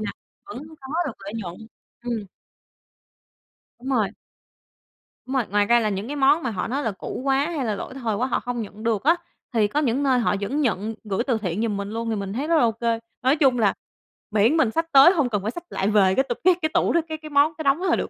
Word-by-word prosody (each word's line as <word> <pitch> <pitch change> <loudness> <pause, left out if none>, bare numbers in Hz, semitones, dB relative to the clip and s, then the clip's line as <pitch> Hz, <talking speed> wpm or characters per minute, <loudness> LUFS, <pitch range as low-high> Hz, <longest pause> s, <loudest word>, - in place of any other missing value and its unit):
nè, 215 - -3 0.4
vẫn 400 - -7 0.2
có 265 - -10 0.2
được 275 - -3
lợi 200 +1 -8
nhuận. 180 -6 -5 0.5
Ừm. 230 -4 -3 1.5
Đúng 260 +3 -7
rồi. 220 -7 +2 1.2
Đúng 265 - -4
rồi, 255 -4 +2
ngoài 205 0 +2
ra 235 +3 +4
là 215 -2 0
những 200 +2 -3
cái 290 - -4
món 285 +3 +3
mà 255 - -1
họ 185 -4 -3
nói 275 +5 -2
là 225 - 0
cũ 195 +5 -6
quá 275 +3 +1
hay 275 -4 -1
là 215 -2 -1
lỗi 200 - -7
thời 235 -5 -2
quá 245 +5 0
họ 260 - 0
không 245 -1 -4
nhận 215 0 -9
được 225 -2 0
á, 330 +4 +5 0.4
thì 215 -3 +3
có 285 +8 -1
những 275 -1 +1
nơi 260 -2 +3
họ 225 - +1
vẫn 270 +9 -1
nhận 220 -3 -1
gửi 210 +2 -1
từ 240 -4 +2
thiện 195 -1 -3
giùm 220 -3 -1
mình 200 0 -4
luôn 230 +1 -3
thì 220 - 0
mình 200 -1 -4
thấy 270 +7 -2
rất 335 - +3
là 310 - +4
ô 230 - +3
kê. 230 0 -1 0.2
Nói 260 +3 +3
chung 265 -5 +3
là 205 -3 +3 0.6
miễn 220 +8 +3
mình 260 -9 +3
xách 330 +4 -2
tới 275 +6 +8
hông 300 -8 +1
cần 210 -5 -2
phải 215 - -1
xách 345 +7 -8
lại 195 - -1
về 195 -3 +4
cái 265 - +3
t - - 0
cái 370 0 +6
cái 315 - +2
tủ - - +2
đó 340 - +3
cái 315 0 -4
cái 310 0 -10
món, 290 +2 +4
cái 315 - -3
đống 280 +3 +3
đó 380 - -2
là 345 - +3
được. - - -2
235 Hz, 265 wpm, -23 LUFS, 210-280 Hz, 1.5 s, tới